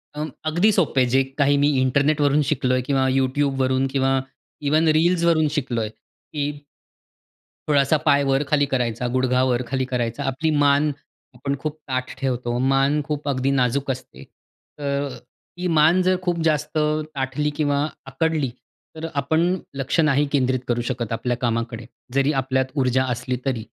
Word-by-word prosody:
अ, 150 - -3 0.3
अगदी 180 +7 +3
सोपं 160 -9 +2
आहे. - - +4
जे 135 +2 +3
काही 145 0 +3
मी 145 +1 +3
इंटरनेट 145 +3 +2
वरून 145 +1 +3
शिकलोय, 130 -3 +1
किंवा 130 0 +1
YouTube 135 +1 +1
वरून 130 +1 +1
किंवा, 135 0 +2 0.4
इव्हन 155 +3 +2
रील्स 170 0 +2
वरून 160 -2 +3
शिकलोय 120 -5 -1
की 145 +6 -6 1.2
थोडासा 145 0 +3
पाय 140 0 +4
वर-खाली 145 +2 +2
करायचा, 125 -3 -1
गुडघा 130 0 +2
वर-खाली 130 +1 0
करायचा. 120 -2 -2
आपली 145 +5 -1
मान 145 +1 +3 0.4
आपण 140 +3 -2
खूप 155 0 -4
ताठ 130 -1 -3
ठेवतो, 125 -3 -1
मान 135 +3 +2
खूप 150 -1 -4
अगदी 135 0 0
नाजूक 135 +1 +1
असते. 125 - -8 0.6
तर 140 0 -1
ती 175 +8 -9
मान 160 +5 +5
जर 185 0 +3
खूप 175 -2 -1
जास्त 150 -1 0
ताठली 150 -2 -1
किंवा 145 0 +1 0.2
आकडली 155 -2 0 0.5
तर 160 +1 -5
आपण 160 +4 +1 0.3
लक्ष 135 +4 -1
नाही 150 -2 +3
केंद्रित 130 -2 +1
करू 120 0 0
शकत 120 -3 -3
आपल्या 120 +2 -1
कामाकडे, 115 -1 -2 0.3
जरी 140 +2 +2
आपल्यात 130 0 0
ऊर्जा 130 -1 +2
असली 125 +1 -3
तरी. 125 -5 -1
135 Hz, 150 wpm, -22 LUFS, 130-150 Hz, 1.2 s, मान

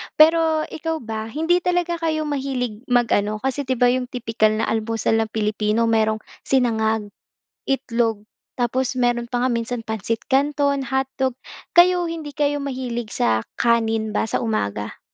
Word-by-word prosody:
Pero 320 0 +5
ikaw 320 -1 -3
ba, 220 -1 -4
hindi 320 +8 +1
talaga 350 -1 0
kayo 315 -2 0
mahilig 265 -6 -2
mag-ano, 215 -4 +2
kasi, 265 +1 -2
'di 260 - +1
ba, 245 0 +4
'yong 250 0 -1
tipikal 225 -3 +1
na 220 - -1
almusal 225 0 0
ng - - -5
Pilipino 215 +1 0
merong 220 -1 +2 0.3
sinangag, 220 -5 +1 0.6
itlog, 235 -5 0 0.4
tapos 250 +1 0
meron 240 -1 +1
pa 245 0 -1
nga - - +2
minsan 235 0 -2
pansit 220 +1 -2
kanton, 280 0 +2
hotdog, 265 -1 0 0.4
kayo 355 0 +5
hindi 320 -3 -5
kayo 290 0 +1
mahilig 250 -4 -4
sa 110 -1 +2 0.2
kanin 225 -2 +1
ba - - +1
sa - - 0
umaga? 105 - -2
245 Hz, 145 wpm, -22 LUFS, 220-285 Hz, 0.6 s, Pero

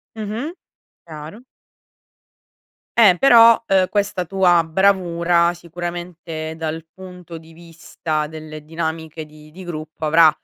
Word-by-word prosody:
Mh-mh. 220 +9 -5 0.5
Chiaro. 155 +7 -10 1.6
Eh 210 -6 +7
però, 230 -2 +6
uhm, 190 -1 +3
questa 205 -3 -1
tua 175 -1 +3
bravura 170 -1 +2
sicuramente 170 -2 -7
dal 160 0 -5
punto 180 -2 -11
di 160 0 -15
vista 165 -2 -5
delle 155 -1 -10
dinamiche 160 0 -5
di 155 0 -17
di 185 +4 -11
gruppo 155 -2 -7
avrà, 160 +1 +6
170 Hz, 110 wpm, -20 LUFS, 160-185 Hz, 1.6 s, Eh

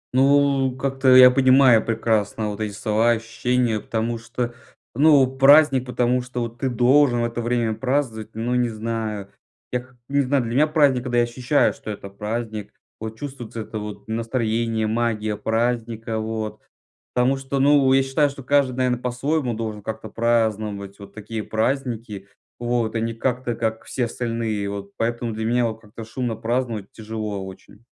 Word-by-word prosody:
Ну, 135 -1 +3
как-то 135 -1 +3
я 125 0 +10
понимаю 130 -3 +5
прекрасно 110 -1 0
вот 100 - -7
эти 105 -1 -2
слова, 110 +2 +1
ощущения, 115 0 0
потому 115 +2 -2
что, 120 +1 -4 0.4
ну, 140 0 +5
праздник, 135 -2 +6
потому 125 0 +1
что 125 0 -5
вот 115 0 -5
ты 135 - 0
должен 125 +1 +4
в - - +1
это 120 0 -3
время 120 -1 0
праздновать, 125 -4 -2
ну 120 +2 -2
не 125 -1 +2
знаю. 110 -2 -4 0.4
Я 125 - 0
как-то 130 0 -17
не 140 0 +2
знаю, 135 -1 +1
для 115 - -4
меня 150 +4 +4
праздник 145 -5 +3
когда 120 -1 -2
я 120 - +5
ощущаю 125 +4 +1
что - - -10
это 100 -1 -6
праздник, 105 +1 -5 0.3
вот 110 0 -6
чувствуется 125 -5 -7
это 110 0 -6
вот 105 +1 -8
настроение, 115 -1 -1
магия 110 -1 -1
праздника, 115 0 -1
вот. 110 -1 -4 0.5
Потому 125 +2 +2
что, 135 0 -3
ну, 140 -1 +5
я 135 - +5
считаю, 140 +2 +1
что 140 - -10
каждый 135 -2 +2
наверно 125 -1 +1
по-своему 125 +2 -1
должен 110 -2 -5
как-то 110 0 -6
праздновать 110 -4 -1
вот 100 0 -12
такие 110 0 -6
праздники, 115 -4 -2 0.3
вот, 120 -2 -1
а - - +1
ни 115 0 -2
как-то, 125 +1 -2
как 110 -1 -2
все 125 -2 -2
остальные, 115 -4 -3
вот. 100 0 -7
Поэтому 120 0 -2
для 110 0 -3
меня 120 0 +2
вот 110 0 -6
как-то 110 +1 -10
шумно 115 +1 -3
праздновать 115 -3 -2
тяжело 110 -3 -5
очень. 100 +4 -13
115 Hz, 165 wpm, -22 LUFS, 110-130 Hz, 0.5 s, я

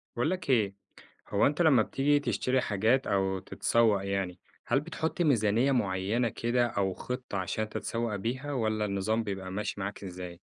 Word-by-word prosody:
باقول 120 +7 +1
لك 180 -6 -4
إيه، 105 -6 +3 0.5
هو 100 - +3
أنت 150 +4 0
لمّا 135 -9 +6
بتيجي 145 +5 +2
تشتري 130 0 0
حاجات 110 +6 +1
أو 95 -1 +1
تتسوّق 110 -3 +2
يعني، 95 -2 -2 0.3
هل 135 - +2
بتحط 165 +2 -3
ميزانية 120 -3 +3
معيّنة 105 0 +1
كده 120 +2 +1
أو 95 -4 -1
خطة 125 -3 -5
عشان 95 +4 -2
تتسوّق 115 0 -2
بيها، 130 +8 -3
والّا 110 -4 0
النظام 105 +3 0
بيبقى 95 -3 -5
ماشي 100 +1 -3
معاك 100 +1 -5
إزاي؟ 90 -2 -7
110 Hz, 160 wpm, -29 LUFS, 100-125 Hz, 0.5 s, لمّا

